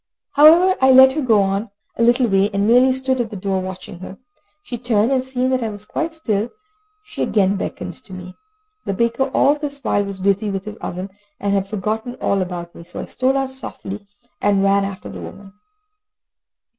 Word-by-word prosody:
However 335 +6 +6
I 265 0 +6
let 260 0 +8
her 305 +3 -2
go 225 -6 +4
on 195 +3 -2 0.3
a - - -3
little 240 +2 +4
way, 195 -1 +2
and 200 -1 0
merely 250 +4 +5
stood 260 -1 0
at 230 - -4
the 210 - -8
door 190 0 -1
watching 185 -1 -8
her. 190 +1 -9 0.5
She 240 -5 -6
turned, 230 -1 +1
and 260 -1 +2
seeing 260 0 -1
that 255 -2 0
I 225 - -1
was 205 0 -9
quite 325 +9 -3
still, 225 -9 -2 0.5
she 420 0 -8
again 200 -2 +2
beckoned 180 -2 -5
to 205 - -15
me. 185 0 -8 0.5
The 195 - -2
baker 235 +5 +1
all 280 - +4
this 285 -2 -5
while 205 - +1
was 200 -1 -6
busy 200 +2 +1
with 195 -1 -4
his 215 0 -7
oven, 185 0 -6 0.3
and 200 0 -1
had 195 -1 0
forgotten 215 +4 -3
all 200 -1 0
about 175 -2 -5
me, - - -11
so 175 - -9
I - - -4
stole 260 +2 0
out 270 -1 -1
softly, 205 -6 -8 0.3
and 200 -1 +2
ran 195 0 +3
after 195 -1 -7
the - - -8
woman. 195 0 -11
210 Hz, 205 wpm, -20 LUFS, 195-260 Hz, 0.5 s, let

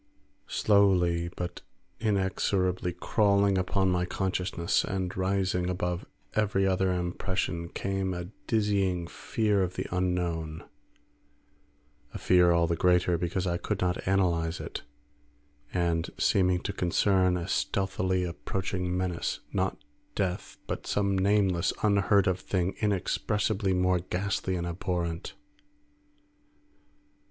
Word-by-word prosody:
Slowly 90 -5 +3
but 90 -1 -4 0.4
inexorably 95 -3 0
crawling 100 +1 +2
upon 95 +1 +1
my 90 0 +1
consciousness 90 -2 0
and 95 -1 -3
rising 95 -1 0
above 90 -1 -2 0.3
every 100 -2 +1
other 95 0 +2
impression, 90 -1 -2
came 95 0 -2
a 90 -1 -4 0.2
dizzying 100 -5 +1
fear 105 +2 0
of 90 -1 -1
the - - -3
unknown; 85 -3 -1 1.5
a - - -1
fear 90 -1 +4
all 85 0 +3
the 85 0 0
greater 90 0 +3
because 90 +2 -1
I 85 -1 0
could 100 +2 -3
not 90 -1 +1
analyse 85 -3 +1
it, - - -6 0.9
and 85 -2 0
seeming 90 -2 +2
to 100 - -3
concern 95 0 +2
a 85 0 -4
stealthily 95 -2 0
approaching 90 +1 -3
menace; 90 -2 -2
not 95 -6 -1 0.3
death, 95 -3 -2
but - - -5
some 100 -1 +1
nameless, 95 -2 +2
unheard 100 -1 +4
of 95 -1 +1
thing 95 -1 -1
inexpressibly 105 0 0
more 90 0 +2
ghastly 95 +1 -2
and 85 -1 -2
abhorrent. 85 -1 -3
90 Hz, 115 wpm, -28 LUFS, 90-95 Hz, 1.5 s, fear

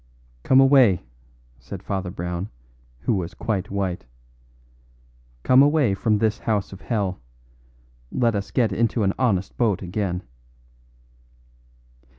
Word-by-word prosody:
"Come 130 - +4
away," 135 - +5 0.6
said 90 +10 -9
Father 95 -3 -3
Brown, 90 +1 -4 0.5
who 90 - 0
was 90 -4 -3
quite 100 -4 -2
white. 95 -3 -2 1.4
"Come 130 +1 +6
away 145 -6 +3
from 105 +2 +1
this 110 0 0
house 105 -3 -1
of 95 - -11
hell. 100 -6 -2 0.9
Let 120 -2 +1
us 100 -1 -3
get 115 -5 +1
into 115 +1 +1
an 95 0 +2
honest 100 -7 0
boat 105 -6 +1
again." 90 -1 -3
100 Hz, 120 wpm, -23 LUFS, 95-115 Hz, 1.4 s, Come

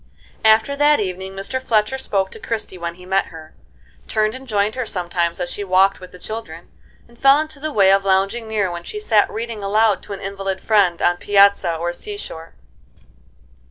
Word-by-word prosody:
After 220 +5 +4
that 295 +1 +4
evening 190 -1 -4
Mr. 195 +7 -3
Fletcher 230 +1 +1
spoke 195 -6 -1
to - - -11
Christie 215 -4 -4
when 170 0 -4
he 180 0 -14
met 190 +1 +1
her, 160 -1 -12 0.5
turned 215 -1 +1
and 260 +1 -9
joined 210 -1 0
her 255 - -3
sometimes 175 -4 -2
as 175 -1 -2
she 205 - -4
walked 195 +1 +3
with 185 - -12
the - - -12
children, 175 -5 -8 0.4
and 235 0 -22
fell 275 +2 +6
into 310 -2 -5
the 310 +2 -4
way 195 -6 +4
of 195 0 +3
lounging 195 +4 +1
near 210 -4 -1
when 170 0 -6
she 420 - -6
sat 220 - +2
reading 225 -1 -5
aloud 210 0 +2
to 205 - -8
an 195 - -7
invalid 195 -1 -4
friend 195 -6 +2
on 175 - +3
piazza 200 -3 +3
or 170 +2 -3
sea 415 - -8
shore. 165 - -9
200 Hz, 195 wpm, -20 LUFS, 185-225 Hz, 0.5 s, fell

